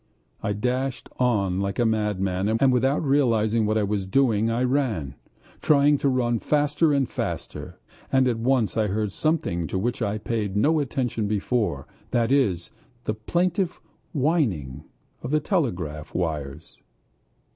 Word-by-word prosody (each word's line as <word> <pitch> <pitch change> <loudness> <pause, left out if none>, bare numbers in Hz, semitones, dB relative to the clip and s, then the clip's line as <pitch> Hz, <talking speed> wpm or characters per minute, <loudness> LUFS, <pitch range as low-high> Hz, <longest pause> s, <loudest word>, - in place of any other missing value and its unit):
I 105 - -1
dashed 125 +4 -2
on 100 -7 +1
like 100 0 -2
a 120 - +2
madman, 105 -3 0
and 130 0 +4
without 135 +5 +2
realizing 115 -6 +2
what 110 +1 +1
I 110 - +2
was 100 -1 -1
doing 115 -1 +2
I 115 +2 0
ran, 125 - 0 0.5
trying 145 -1 +4
to 140 - +2
run 120 -3 +1
faster 150 +3 +2
and 140 -3 +2
faster. - - -5 0.3
And 130 -1 +4
at 120 -2 0
once 125 -2 +1
I 110 -1 +1
heard 105 +1 -1
something 95 - -1
to - - -3
which 120 +5 -2
I 100 - 0
had 105 0 -6
paid 105 -4 -2
no 155 +9 +3
attention 125 -5 -1
before: 100 - -1 0.2
that 115 0 +1
is, 105 -12 +1 0.3
the 110 - -1
plaintive 175 - -1 0.3
whining 130 - 0 0.4
of 125 - -5
the 155 +2 +2
telegraph 90 - -2
wires. 75 -3 -4
115 Hz, 150 wpm, -25 LUFS, 100-135 Hz, 0.5 s, and